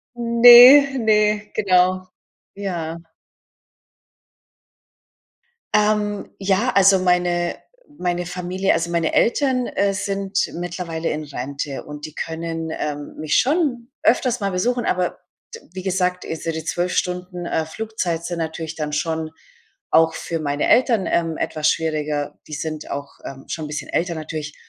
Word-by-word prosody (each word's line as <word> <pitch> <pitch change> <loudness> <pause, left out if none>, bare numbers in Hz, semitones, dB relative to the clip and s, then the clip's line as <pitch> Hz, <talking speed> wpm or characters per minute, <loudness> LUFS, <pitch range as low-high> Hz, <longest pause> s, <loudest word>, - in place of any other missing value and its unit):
Ne, 245 +4 +8
ne, 210 -1 +2
genau. 185 -2 +2 0.5
Ja. 170 -4 -5 2.7
Ähm, 210 -1 +1
ja, 200 +5 +1
also, 195 0 +6
meine 175 -1 +1 0.4
meine 175 -1 -2
Familie 180 +2 -1
also, 170 +1 -1
meine 170 -2 0
Eltern, 255 0 +2
äh, 200 0 0
sind 195 0 -2
mittlerweile 170 -1 -4
in 155 0 -3
Rente 140 +1 -5
und 150 +1 -8
die 155 - -14
können, 165 0 -4
ähm, 145 -1 -5
mich 155 -1 0
schon 265 -4 0
öfters 250 -2 +2
mal 200 - -1
besuchen, 240 +7 0
aber 180 -1 -1 0.3
t 460 - -8
wie 185 0 -6
gesagt, 180 -1 -1
diese 165 +1 -4
die 160 0 -5
12 175 +2 -1
Stunden, 180 0 -3
äh, 160 -1 -1
Flugzeit 175 -4 -3
sind 175 -1 -4
natürlich 160 0 -4
dann 150 -1 -4
schon 160 +1 -2 0.6
auch 160 0 +4
für 165 -1 -4
meine 145 -1 -1
Eltern, 235 -6 +3
ähm, 165 -2 0
etwas 155 -1 0
schwieriger. 150 -2 -2
Die 155 - -5
sind 155 0 -5
auch, 140 0 -5
ähm, 135 0 -9
schon 160 - -4
'n - - -8
bisschen 150 - -5
älter 170 +1 -1
natürlich. 155 -1 -6
175 Hz, 140 wpm, -21 LUFS, 160-200 Hz, 2.7 s, Ne